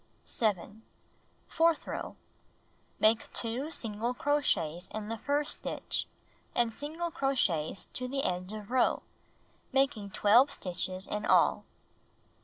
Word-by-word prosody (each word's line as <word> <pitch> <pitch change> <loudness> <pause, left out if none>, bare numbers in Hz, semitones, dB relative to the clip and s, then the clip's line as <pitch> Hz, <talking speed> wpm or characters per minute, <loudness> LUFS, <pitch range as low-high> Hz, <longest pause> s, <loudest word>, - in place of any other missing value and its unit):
7. 210 -1 -1 0.7
Fourth 330 -1 +2
row: - - -5 0.8
Make 220 +1 +3
2 245 +6 0
single 230 -4 -2
crochets 190 - +1
in 215 -1 -5
the 225 - -3
first 290 +4 0
stitch - - -2 0.5
and 235 -2 +2
single 320 +6 -4
crochets 235 - 0
to 255 - -2
the 275 +2 -2
end 180 +2 -1
of 215 +1 -8
row, 255 -1 +2 0.7
making 265 -7 +1
12 230 +8 +5
stitches 185 +1 -2
in 210 0 -3
all. - - +4
225 Hz, 115 wpm, -31 LUFS, 200-275 Hz, 0.8 s, 12